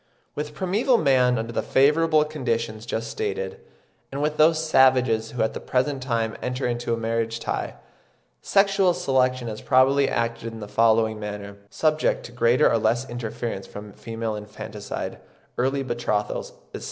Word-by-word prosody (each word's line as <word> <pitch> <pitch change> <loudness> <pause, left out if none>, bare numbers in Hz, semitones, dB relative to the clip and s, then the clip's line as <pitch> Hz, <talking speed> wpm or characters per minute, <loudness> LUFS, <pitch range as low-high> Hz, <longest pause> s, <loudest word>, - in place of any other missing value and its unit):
With 150 0 -5
primeval 205 - +2
man 130 - +3
under 115 +1 -3
the - - 0
favourable 155 +3 +3
conditions 115 -7 -3
just 115 0 -3
stated, 450 +2 -3 0.5
and 140 - -4
with 150 +1 -1
those 160 +1 +5
savages 130 -6 +4
who 120 -1 -1
at 110 - -1
the - - -5
present 135 +1 -1
time 115 -4 -1
enter 125 +1 -2
into 120 -1 -1
any 115 - -3
marriage 115 0 -1
tie, - - -3 0.7
sexual 195 -2 +3
selection 130 -2 +1
has 110 -1 -6
probably 135 +1 +4
acted 115 0 -2
in 115 - -8
the 105 - -7
following 110 0 +2
manner, 100 -1 -6
subject 155 +4 +1
to - - -9
greater 125 +3 +3
or 115 - +2
less 115 +4 +1
interference 115 -3 -4
from 105 0 -10
female 115 -1 -4
infanticide, 105 0 -6 0.4
early 135 +2 +1
betrothals, 120 -4 -2 0.2
etc. - - -5
120 Hz, 155 wpm, -24 LUFS, 115-140 Hz, 0.7 s, those